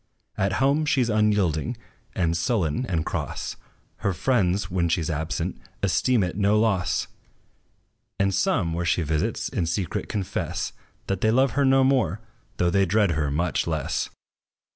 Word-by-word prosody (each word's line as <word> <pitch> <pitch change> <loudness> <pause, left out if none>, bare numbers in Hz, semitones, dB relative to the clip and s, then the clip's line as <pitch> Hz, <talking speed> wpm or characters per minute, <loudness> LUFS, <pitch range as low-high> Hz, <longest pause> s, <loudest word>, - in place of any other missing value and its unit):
At 95 0 0
home, 140 +8 +2
she 140 -3 +3
's 120 - -2
unyielding, 105 -8 +1 0.4
and 85 -2 +1
sullen, 90 - 0
and 80 -6 -1
cross: - - -3 0.4
Her 100 - -1
friends, 95 -6 +1
when 85 -2 +1
she 80 0 +1
's 80 - -2
absent, 80 +1 -3 0.2
esteem 110 +4 +2
it 90 -2 -2
no 105 +1 +3
loss; 95 - +1 1.1
And 100 0 +2
some, 90 -2 +1
where 85 +1 -1
she 85 0 +1
visits, 75 0 -1
in 85 - -2
secret 85 +1 -2
confess, 100 -4 -3 0.3
That 95 -2 -2
they 110 - +3
love 130 +3 +3
her 140 +4 +2
no 135 0 +5
more, 125 -8 +2 0.4
though 90 -1 +2
they 100 +1 +3
dread 100 0 +3
her 75 -2 0
much 85 +3 0
less. - - -1
95 Hz, 160 wpm, -25 LUFS, 85-110 Hz, 1.1 s, no